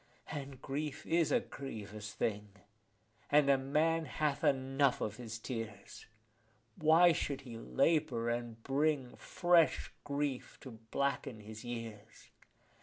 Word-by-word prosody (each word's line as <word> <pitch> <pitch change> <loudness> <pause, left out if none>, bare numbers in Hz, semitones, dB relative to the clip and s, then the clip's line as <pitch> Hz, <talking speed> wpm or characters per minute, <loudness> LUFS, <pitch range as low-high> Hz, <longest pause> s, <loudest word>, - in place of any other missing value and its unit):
And 140 -3 -6
grief 145 +1 -4
is 165 -1 +2
a - - +5
grievous 105 -5 -7
thing, 105 -1 -2 0.8
and 145 -1 +6
a 135 - +5
man 155 +4 +1
hath 145 +1 -1
enough 135 0 +2
of 105 0 -3
his 115 -3 -6
tears: 110 -4 -7 0.7
Why 160 +3 +6
should 140 -3 -2
he 125 -4 -9
labour, 120 - +1
and 120 -1 -4
bring 140 -2 +1
fresh 175 -2 +2
grief 140 -2 -2
to 130 - -9 0.2
blacken 140 -4 -1
his 110 +2 -9
years? 115 -3 -8
135 Hz, 120 wpm, -34 LUFS, 115-150 Hz, 0.8 s, and